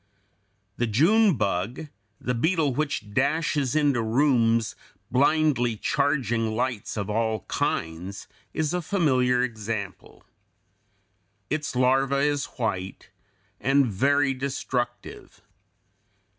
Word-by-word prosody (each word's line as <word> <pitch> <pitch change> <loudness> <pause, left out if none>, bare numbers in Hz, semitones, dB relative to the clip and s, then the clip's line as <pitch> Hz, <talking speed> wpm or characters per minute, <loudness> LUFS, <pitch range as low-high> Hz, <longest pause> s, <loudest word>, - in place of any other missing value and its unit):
] 100 0 -45
The 120 - +1
June 180 - +4
bug, 105 - -2 0.3
the 125 - -2
beetle 155 +2 +1
which 120 -7 -3
dashes 145 0 +1
into 145 -5 +2
rooms, 115 -2 +2 0.4
blindly 140 -4 +2
charging 120 -5 0
lights 120 -3 -2
of 100 -2 -2
all 110 0 -1
kinds, 85 +5 -3 0.2
is 155 +1 -1
a 180 - 0
familiar 130 -9 +2
example. 110 -4 -5 1.3
Its 150 -3 -2
larva 135 +2 +2
is 145 0 +1
white 95 -6 -4 0.5
and 135 +2 +3
very 140 +6 +2
destructive. 130 -2 -4
125 Hz, 100 wpm, -25 LUFS, 110-145 Hz, 1.3 s, June